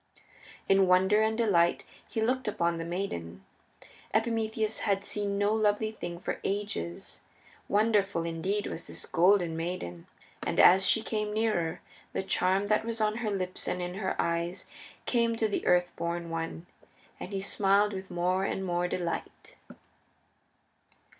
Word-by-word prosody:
In 195 -1 +5
wonder 190 +4 +4
and 220 0 +1
delight 180 -7 +2 0.2
he 220 - -2
looked 255 +2 0
upon 170 -4 0
the 165 - -4
maiden. 95 - -4 0.7
Epimetheus 220 -1 0
had 200 -1 0
seen 200 -1 -1
no 205 +1 +2
lovely 215 0 +1
thing 175 -5 -6
for - - -4
ages. 195 - -4 0.5
Wonderful 205 -4 +2
indeed 175 +5 -2
was 165 - -6
this - - -7
Golden 175 -2 +3
Maid, 175 +3 -3
and 85 -1 -7
as 185 +1 +7
she 220 - +3
came 210 -1 -2
nearer 210 -7 0 0.3
the - - -1
charm 190 +1 +1
that 215 +1 +2
was 230 0 -4
on 215 0 +1
her 235 -2 -2
lips 185 -2 -3
and 180 - -1
in 180 0 -3
her 190 0 -2
eyes 170 +1 -1 0.4
came 235 -2 +2
to 225 -1 +1
the 205 - -2
Earth 180 0 +3
born 170 0 -3
One, 165 0 -4 0.5
and 185 - -7
he 195 - -2
smiled 200 +1 +2
with 190 0 -6
more 180 +2 0
and 190 0 -2
more 175 0 0
delight. 175 -1 -4
195 Hz, 150 wpm, -29 LUFS, 175-215 Hz, 0.7 s, as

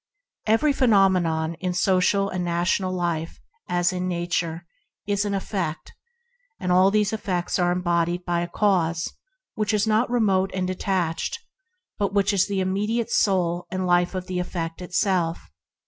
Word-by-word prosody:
Every 255 +7 +3
phenomenon 185 -10 +3
in 180 -1 -2
social 190 +2 +2
and 185 -2 -3
national 175 +2 0
life 170 -3 -2 0.2
— 455 - -37
as 175 +1 +2
in 180 0 -2
Nature 170 -1 -2 0.2
— - - -57
is 205 0 0
an 200 -1 -1
effect, 190 -5 -4 0.7
and 180 - -1
all 185 +2 +5
these 210 +1 +1
effects 185 -5 -2
arise 175 0 +2 0.4
in 180 - -22
a 175 0 0
cause 170 -5 +1 0.4
neither 215 +2 +1
remote 195 -5 +2
nor 185 -1 -1
detached, 185 - -1 0.6
but 200 0 -1
the 200 -1 +2
immediate 210 +5 -1
soul 175 -4 +1
and 185 0 -2
life 175 +1 +2
of 185 -1 -3
the 185 -1 -3
effect 170 -1 -4
itself. 180 - -1
185 Hz, 140 wpm, -24 LUFS, 175-200 Hz, 0.7 s, all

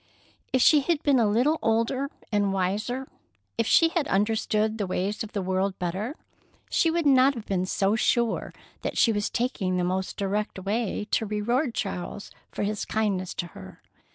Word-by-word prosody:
If 260 - +3
she 305 - +7
had 310 +2 0
been 280 -3 +4
a 225 - +3
little 255 +9 +2
older 230 +5 +1 0.2
and 205 -2 +2
wiser, 205 +8 -1 0.5
if 230 - +2
she 330 - +5
had 325 -3 -1
understood 215 0 +1
the 200 - -1
ways 195 +4 -2
of 220 - -9
the 200 -3 -2
world 190 +1 -1
better, 190 - -3 0.6
she 330 - +3
would 335 0 0
not 270 0 +5
have 225 -3 -7
been 185 -1 -1
so 195 +2 +1
sure 235 +1 +1 0.3
that - - -3
she 230 - +5
was 205 0 -1
taking 200 -7 -1
the 180 - +1
most 185 +1 -2
direct 205 +2 -2
way 210 +2 -2
to 220 - +1
reward 235 +6 0
Charles 180 +3 -4 0.2
for - - -3
his 210 0 -2
kindness 200 -4 -1
to 175 - -3
her. 95 0 -12
215 Hz, 180 wpm, -26 LUFS, 195-250 Hz, 0.6 s, she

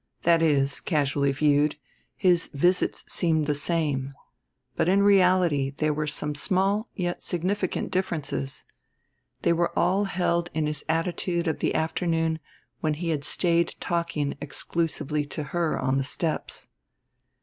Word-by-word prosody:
That 170 -1 +4
is, 140 -3 +2
casually 140 -3 +1
viewed, 145 +1 +2 0.4
his 180 -3 +3
visits 175 +6 +1
seemed 160 -3 +1
the 150 - +1
same; 145 -3 -1 0.6
but 170 - +1
in 200 +2 +4
reality 180 -8 +4
there 155 -1 +1
were 150 0 -2
some 150 0 -3
small 195 +8 +1
yet 175 -2 -2
significant 185 +2 -2
differences. 160 -7 -2 0.8
They - - +4
were 170 +1 +1
all 190 +4 +2
held 175 -2 0
in 155 -1 +1
his 150 -1 -2
attitude 170 +1 0
of 160 - -1
the - - 0
afternoon 160 0 0 0.4
when 155 -2 0
he 170 +2 -3
had 150 -3 -1
stayed 170 +4 +1
talking 170 -4 -1
exclusively 150 0 -2
to 150 - -4
her 170 -2 +1
on 135 +1 +1
the - - 0
steps. 155 +4 -3
165 Hz, 140 wpm, -26 LUFS, 150-175 Hz, 0.8 s, That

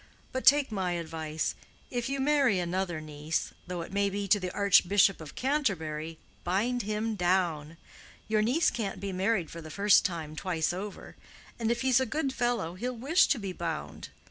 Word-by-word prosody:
But 260 - -3
take 285 -3 +6
my 190 -4 -1
advice. 160 -2 -3 0.4
If 245 0 -2
you 275 0 -2
marry 275 -6 +3
another 175 -1 -2
niece, 155 +1 -3
though 180 -1 -4
it 170 - -11
may 200 0 +2
be 200 0 -3
to 205 - +5
the 185 -1 -3
Archbishop 200 -1 +4
of 155 - -10
Canterbury, 165 - -1 0.3
bind 230 +8 0
him 215 +2 -2
down. 175 -5 0 0.5
Your 215 0 +2
niece 255 +10 +2
can't 210 -5 -3
be 200 -1 -4
married 190 -2 0
for 165 - -8
the 155 - -9
first 200 +4 +4
time 160 -4 -3
twice 165 0 -1
over. 195 +2 -7 0.4
And 225 -1 0
if 235 0 0
he's 260 -1 +4
a 260 - 0
good 275 +2 -1
fellow, 240 -10 -1
he'll 245 +6 -4
wish 305 +10 +4
to 285 - +2
be 195 -4 -5
bound. 170 -3 -5
195 Hz, 180 wpm, -29 LUFS, 170-240 Hz, 0.5 s, take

